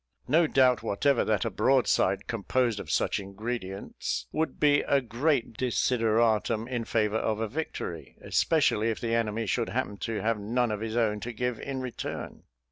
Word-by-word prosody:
No 160 +4 +4
doubt 130 -3 +4
whatever 120 +5 +2
that 105 -4 +1
a - - -1
broadside 105 -7 +2
composed 115 0 0
of - - -8
such - - +1
ingredients, 100 0 -4
would 160 +1 -2
be 145 -1 +4
a 140 - +2
great 125 0 0
desideratum 115 -2 +1
in 120 -3 -3
favour 110 -1 +1
of 110 -1 -1
a 115 - -1
victory, 105 - -5
especially 110 +2 +2
if 110 - -2
the 115 -1 -2
enemy 115 -1 0
should 115 +3 0
happen 115 -5 -2
to 110 +1 -3
have 115 -1 +1
none 120 +3 0
of 105 - -2
his 110 +1 -3
own 105 -3 +1
to 120 - -5
give 125 0 -2
in 135 -2 -4
return. 125 -2 -6
115 Hz, 170 wpm, -28 LUFS, 105-125 Hz, -, No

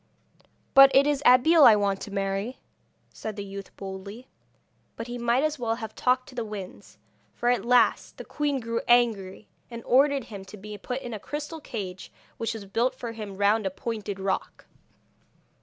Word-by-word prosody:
'But 275 0 +9
it 275 +1 +6
is 290 -1 +1
Abeille 290 +6 +6
I 225 - +9
want 200 -2 0
to - - -6
marry,' 195 +4 -2 0.6
said 215 -2 -6
the 205 - -5
youth 195 0 -8
boldly. 200 +5 -8 0.7
But 230 - -6
he 240 0 -6
might 240 +3 +2
as 310 -2 -1
well 225 -2 -1
have 220 -2 -7
talked 255 -2 +1
to - - -13
the 240 -2 -3
winds, 190 - -9 0.4
for 240 - 0
at 245 - +1
last 245 -1 +2
the - - -8
queen 290 -2 -1
grew 230 -1 -3
angry, 220 -5 +2 0.2
and 235 -1 -8
ordered 275 +1 +3
him 205 -4 -9
to 200 +2 -11
be 210 +1 -9
put 250 +6 -5
in 240 - -6
a 215 - -5
crystal 300 - -6
cage 190 -9 -7 0.3
which 230 0 -3
was 210 -3 -8
built 235 +6 0
for 240 -3 -6
him 210 -4 -8
round 205 +1 +2
a - - 0
pointed 205 0 -5
rock. 195 0 -3
230 Hz, 185 wpm, -26 LUFS, 200-250 Hz, 0.7 s, But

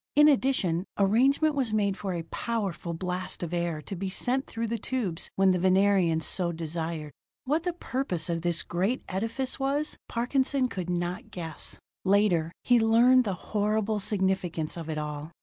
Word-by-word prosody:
In 295 +1 +7
addition, 255 - +2
arrangement 265 +10 +3
was 265 -6 0
made 200 -2 +1
for 195 -2 -4
a 170 - -3
powerful 190 -4 -3
blast 180 +1 -3
of 175 0 -4
air 170 -3 -1
to 195 - -6
be 190 +2 -3
sent 255 +7 -1
through 230 0 -3
the 230 0 -2
tubes 205 -8 -2
when 190 0 +4
the 180 - +1
Venerians 185 -3 +3
so 175 -2 +1
desired. 160 -1 -4 0.3
What 310 +6 0
the 355 - 0
purpose 250 - -2
of 170 -1 -1
this 170 0 +1
great 190 +9 -1
edifice 230 +8 -2
was, 280 +3 -1
Parkinson 260 +2 +1
could 180 -4 -4
not 175 +6 -2
guess: 165 -4 -4 0.3
later, 190 -5 +3
he 245 -1 +5
learned 235 +3 +5
the 195 -3 -1 0.2
horrible 215 0 +1
significance 190 -5 0
of 165 -2 -6
it 155 - -2
all. 150 0 -4
195 Hz, 165 wpm, -28 LUFS, 170-240 Hz, 0.3 s, In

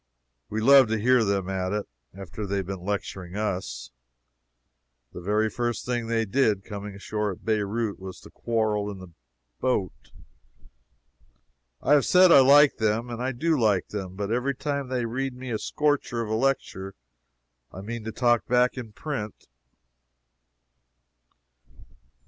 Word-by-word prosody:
We 110 - -2
love 135 +1 +7
to 110 +1 0
hear 125 +2 +3
them 100 -3 0
at 95 -1 -2
it, 105 -1 -2 0.2
after 100 +2 -7
they 100 - -2
have 95 - -2
been 95 -1 -6
lecturing 95 -2 -4
us. 90 - -3 1.2
The - - -8
very 105 +4 +1
first 120 +1 -3
thing 120 -2 -2
they 115 -1 0
did, 105 -3 +1
coming 100 -1 -7
ashore 105 +1 -3
at - - -16
Beirout, 110 0 -1
was 95 -1 -8
to - - -14
quarrel 110 -3 -1
in 100 - -7
the 95 -1 -11 0.5
boat. 95 - -2 1.7
I 145 - +4
have 145 -2 +4
said 180 -1 +6
I 140 - +9
like 140 +2 +6
them, 110 +2 0
and 120 0 -5
I 130 +1 -1
do 160 +6 0
like 105 -5 +2
them 95 -3 -5
but 100 +1 -3
every 130 +3 0
time 140 0 -3
they 125 -2 -1
read 130 +3 -3
me 130 0 -7
a 110 - -1
scorcher 145 -5 0
of 110 - -5
a - - +1
lecture 110 -6 -1 0.8
I 95 - -8
mean 115 +2 -6
to 110 - -3
talk 120 +1 +1
back 125 +1 +2
in 115 -4 -9
print. 110 -4 -6
110 Hz, 155 wpm, -26 LUFS, 100-125 Hz, 1.7 s, I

